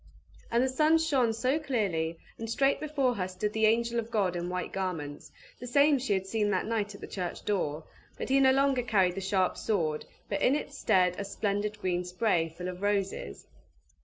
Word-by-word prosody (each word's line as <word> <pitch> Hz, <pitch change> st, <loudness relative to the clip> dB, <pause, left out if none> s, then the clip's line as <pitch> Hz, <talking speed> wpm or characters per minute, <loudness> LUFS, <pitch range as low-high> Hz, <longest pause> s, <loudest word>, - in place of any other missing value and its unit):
And 235 Hz, +2 st, +2 dB
the -, -, +2 dB
sun 305 Hz, +5 st, +4 dB
shone 275 Hz, -8 st, +2 dB
so 255 Hz, +7 st, 0 dB
clearly, 190 Hz, -, -1 dB, 0.2 s
and 225 Hz, 0 st, -5 dB
straight 270 Hz, +4 st, +2 dB
before 285 Hz, -4 st, 0 dB
her 185 Hz, -5 st, -2 dB
stood 190 Hz, +3 st, -3 dB
the 220 Hz, 0 st, +3 dB
angel 235 Hz, +1 st, +2 dB
of 230 Hz, 0 st, -5 dB
God 200 Hz, -6 st, 0 dB
in 175 Hz, 0 st, -3 dB
white 180 Hz, 0 st, -3 dB
garments, 165 Hz, -7 st, -4 dB, 0.3 s
the 245 Hz, -, -7 dB
same 280 Hz, +2 st, +4 dB
she 245 Hz, -4 st, 0 dB
had 190 Hz, -1 st, -1 dB
seen 210 Hz, +1 st, 0 dB
that 190 Hz, -2 st, 0 dB
night 210 Hz, -2 st, -2 dB
at -, -, -13 dB
the -, -, -7 dB
church 180 Hz, -3 st, -5 dB
door; 165 Hz, -7 st, -1 dB, 0.3 s
but -, -, -5 dB
he 270 Hz, +1 st, +4 dB
no 265 Hz, -1 st, +6 dB
longer 270 Hz, -1 st, +3 dB
carried 195 Hz, -6 st, +2 dB
the 195 Hz, -, -5 dB
sharp 190 Hz, -1 st, +1 dB
sword, 160 Hz, -8 st, -1 dB, 0.2 s
but 200 Hz, -, -2 dB
in 265 Hz, -, +4 dB
its 285 Hz, -1 st, -4 dB
stead 185 Hz, -8 st, +2 dB
a -, -, -2 dB
splendid 205 Hz, +1 st, -2 dB
green 180 Hz, -3 st, -1 dB
spray, 180 Hz, -2 st, 0 dB
full 180 Hz, +3 st, -7 dB
of 180 Hz, 0 st, -6 dB
roses. 195 Hz, -, -2 dB
210 Hz, 205 wpm, -29 LUFS, 185-245 Hz, 0.3 s, no